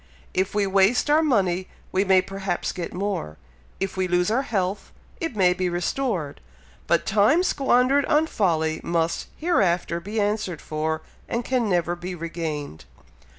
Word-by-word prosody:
If 190 +2 0
we 205 -1 +2
waste 195 +8 +3
our 310 +2 +5
money, 190 - +1 0.2
we 190 - +2
may 190 -2 +4
perhaps 195 -2 -3
get 175 -2 -5
more 185 - -3 0.4
if 195 0 -2
we 185 -1 0
lose 180 +2 +1
our 245 +4 +2
health, 195 -7 -2 0.3
it 330 - -3
may 180 -3 +4
be 180 0 -1
restored 175 - -2 0.5
but - - +2
time 220 - +4
squandered 270 -3 +3
on 305 +1 +3
folly, 160 - 0
must 165 -1 -1
hereafter 180 - +1
be 205 +6 -4
answered 205 -5 -1
for, 160 +1 -3 0.3
and 235 0 -2
can 250 -4 +1
never 175 -1 +1
be 180 +1 -6
regained. 160 - -5
190 Hz, 150 wpm, -24 LUFS, 175-220 Hz, 0.5 s, our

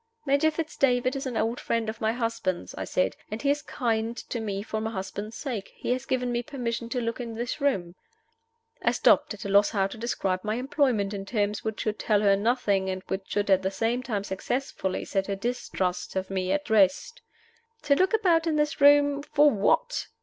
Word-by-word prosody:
"Major 280 +3 +3
Fitz 315 0 -4
David 255 0 +2
is 275 0 -3
an 245 -3 -3
old 230 +3 0
friend 230 -1 -1
of 220 +1 -5
my 220 0 +2
husband's," 230 -6 -2
I - - -5
said, 185 - 0
"and 215 - -4
he 280 +2 +2
is 290 +1 -1
kind 230 -4 -1
to 240 - -1
me 200 -3 -3
for 220 0 -3
my 220 - -2
husband's 205 +1 -5
sake. 235 -9 -5
He - - -3
has 255 +1 -2
given 250 -1 0
me 240 0 0
permission 235 -3 -4
to 250 - -1
look 230 0 -3
in 235 -2 -5
this 240 +5 -4
room 190 -12 0 0.5
" 460 +1 -44
I - - +2
stopped, - - +3
at 200 - -10
a - - -3
loss 200 +1 +5
how 195 -3 +1
to 195 +3 -6
describe 195 -5 -1
my 215 +1 -1
employment 250 -6 +1
in 195 -1 -4
terms 205 0 -1
which 220 -1 -3
should 215 -1 -2
tell 210 -3 +2
her 200 -1 +5
nothing, 200 -3 +1
and 185 0 -4
which 190 0 -3
should 205 -1 0
at 190 0 +5
the 190 - 0
same 225 +5 -1
time 215 -6 -2
successfully 195 0 -3
set 195 -1 -1
her 200 - -1
distrust 195 -5 -3
of 190 0 -2
me 185 -1 -1
at 295 -4 -1
rest. 210 - +3 0.6
"To 290 -2 +4
look 375 +8 +3
about 345 -6 +3
in 320 - +1
this 300 -1 0
room 285 0 +6
for 295 0 +4
what?" 470 - +1
230 Hz, 215 wpm, -27 LUFS, 200-275 Hz, 0.6 s, room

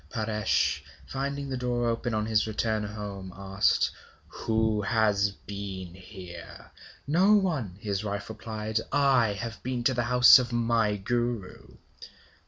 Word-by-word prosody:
Paresh, 110 -2 0 0.2
finding 140 +1 -3
the 130 -1 -3
door 120 -1 -1
open, 115 0 -1
on 110 0 0
his 110 -1 +1
return 110 0 -1
home, 100 -2 -6
asked: 95 0 +1 0.4
'Who 110 -1 0
has 105 -1 +2
been 100 -3 -7
here?' 90 -2 -11 0.3
'No 180 +8 +4
one!' 160 - +1
his 100 -1 -2
wife 100 -1 -4
replied. 110 0 -4
'I 130 -7 +3
have 110 +3 -6
been 125 -1 -3
to 130 - +3
the 120 -1 -1
house 125 +1 +8
of 125 -1 -3
my 115 -3 +1
Guru.' 120 0 -3
110 Hz, 135 wpm, -28 LUFS, 100-120 Hz, 0.4 s, house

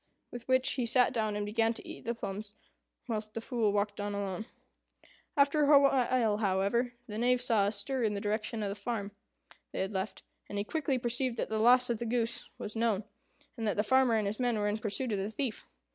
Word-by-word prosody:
With 240 -1 -8
which 260 0 +3
he 250 -3 -1
sat 250 +2 +4
down 215 -3 0
and 205 0 -2
began 225 +2 +1
to - - -8
eat - - -9
the 235 +1 -1
plums, 205 -1 -5 0.5
whilst 215 -2 -3
the - - -1
Fool 225 -3 0
walked 205 0 -1
on 205 0 -2
alone. 200 +2 -3 0.9
After 285 +1 +4
a 285 - +9
while, 250 -5 +3
however, 210 +4 +1
the 215 -3 -5
Knave 250 +1 +3
saw 225 -5 +2
a - - +1
stir 245 +6 -2
in 215 -3 +1
the - - -2
direction 215 +1 -2
of 200 - -1
the - - -2
farm 205 0 -4 0.6
they - - -3
had 190 +2 -2
left, 190 +2 -3 0.3
and 205 - -4
he 200 - 0
quickly 280 +2 -1
perceived 240 0 -1
that - - -2
the 220 0 -1
loss 245 +2 +5
of 230 - -2
the 235 - -3
goose 235 0 -1
was 210 - -6
known, 225 -3 +1 0.5
and 225 -2 -3
that 205 - 0
the 210 - +3
farmer 260 +1 +4
and 215 -2 +1
his 205 +3 -2
men 245 -3 +1
were 205 0 0
in 210 +1 -1
pursuit 220 +3 -2
of 205 - 0
the 195 +2 -2
thief. 235 0 -4
225 Hz, 225 wpm, -31 LUFS, 205-245 Hz, 0.9 s, a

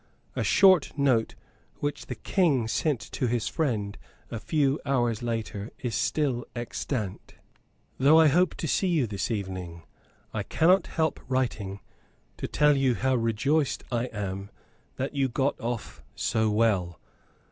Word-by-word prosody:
A - - 0
short 185 -7 +5
note 130 -6 +2 0.4
which 145 0 -4
the - - -4
King 145 - +1
sent 145 +3 0
to 125 - -1
his 120 -1 0
friend 105 - -1 0.3
a 115 - -3
few 145 +1 +1
hours 120 -5 0
later 115 -3 -3
is 120 -3 -4
still 130 0 0
extant. 120 -3 -4 0.6
"Though 145 +5 +6
I 160 - +7
hope 170 +4 +3
to 160 - -4
see 190 - +1
you 165 -7 +2
this 100 -3 -3
evening, 95 -6 -4 0.5
I - - -1
cannot 180 +4 +3
help 160 -1 -1
writing 115 -7 -2 0.6
to - - -4
tell 150 -1 +4
you 135 -3 +2
how 130 +2 +1
rejoiced 125 +6 +1
I 120 0 0
am 100 -4 -5 0.5
that 135 +2 -3
you 135 -2 +1
got 135 +3 0
off 115 -9 -4
so 110 +10 +1
well. 105 -6 +1
120 Hz, 145 wpm, -27 LUFS, 110-145 Hz, 0.6 s, I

